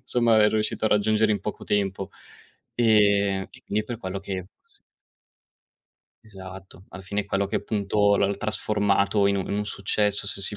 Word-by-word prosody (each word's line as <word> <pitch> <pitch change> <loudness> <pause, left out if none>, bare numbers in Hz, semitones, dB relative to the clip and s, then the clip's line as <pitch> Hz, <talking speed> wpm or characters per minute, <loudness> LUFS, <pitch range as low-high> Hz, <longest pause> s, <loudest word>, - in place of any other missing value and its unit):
insomma 120 -2 +2
avrei 105 -1 +5
riuscito 110 0 -1
a - - +4
raggiungere 110 +1 +2
in 100 - -2
poco 105 - -6
tempo. 95 -2 -1 0.6
Ehm, 100 -4 +3
e - - -16
quindi 105 - -1
è - - -17
per 120 +1 -6
quello 95 -3 -5
che 95 -2 -5 1.8
Esatto, 95 -2 -12
alla 95 +2 -10
fine 100 +2 -2
è 100 - -6
quello 100 0 0
che 100 +2 -2
appunto, 105 -1 +1
l'hanno 100 0 +1
trasformato 100 -1 +1
in 100 0 +2
un 95 - -2
un 105 0 -2
successo 100 0 -1
se 100 - -2
si 105 - -4
100 Hz, 170 wpm, -25 LUFS, 100-105 Hz, 1.8 s, avrei